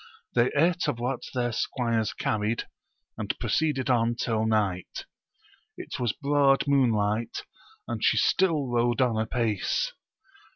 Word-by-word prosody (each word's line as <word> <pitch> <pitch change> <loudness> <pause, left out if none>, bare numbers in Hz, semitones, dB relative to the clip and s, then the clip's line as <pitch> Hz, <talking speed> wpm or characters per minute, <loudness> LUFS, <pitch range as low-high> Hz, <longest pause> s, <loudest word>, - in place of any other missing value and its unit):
They 120 0 +3
ate 170 +3 +2
of 145 -5 -1
what 125 +2 -2
their 120 -1 0
squires 115 -1 -1
carried, 110 +2 -2 0.5
and - - -2
proceeded 145 -5 0
on 120 -1 +2
till 110 -2 -1
night: 100 -5 -1 0.7
it - - -7
was 120 -3 +1
broad 140 +1 +2
moon 135 -4 +4
light, 110 +2 -1 0.4
and - - -4
she - - +4
still 165 -7 +2
rode 120 0 +1
on 125 -3 +2
apace. 110 -3 -1
120 Hz, 130 wpm, -27 LUFS, 110-135 Hz, 0.7 s, moon